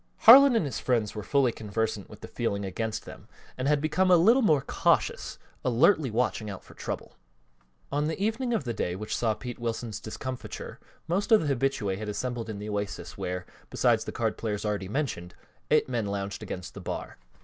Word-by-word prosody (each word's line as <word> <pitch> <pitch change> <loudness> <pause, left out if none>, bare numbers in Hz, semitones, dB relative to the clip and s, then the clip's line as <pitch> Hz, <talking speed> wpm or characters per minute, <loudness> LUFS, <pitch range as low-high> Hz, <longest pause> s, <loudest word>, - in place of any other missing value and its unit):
Harlan 265 +3 +10
and 220 - +2
his 125 -6 -3
friends 115 -5 0
were 105 - -5
fully 135 +3 +2
conversant 110 -1 -3
with - - -13
the - - -7
feeling 100 0 -2
against 110 +3 -3
them - - -11 0.3
and 130 +1 -2
had 150 0 +3
become 155 +5 +1
a 180 - +7
little 225 +10 +5
more 155 - +3
cautious, - - +1 0.3
alertly 135 - +4
watching 110 -1 -1
out 100 - -7
for - - -15
trouble. - - -6 0.7
On 145 +2 0
the 160 - -3
evening 225 +5 0
of 225 - 0
the 120 -3 -3
day 90 -4 -2
which 105 +3 -4
saw 110 -2 +1
Pete 125 +1 -7
Wilson's 115 -2 -3
discomfiture 130 +3 -6 0.3
most 195 +7 -1
of 210 -9 +5
the 140 - +2
habitués 105 -7 -1
had 110 -1 -4
assembled 120 +1 -3
in 105 - -4
the 105 +1 -6
Oasis 105 -1 -4
where, 90 0 -4 0.2
besides - - +2
the - - -4
card 110 -2 -2
players 105 -2 -2
already 100 -3 -2
mentioned, 105 - -3 0.3
eight - - +4
men 115 -5 -1
lounged 100 0 -3
against 90 -2 -6
the - - -9
bar. - - -6
120 Hz, 195 wpm, -28 LUFS, 105-150 Hz, 0.7 s, Harlan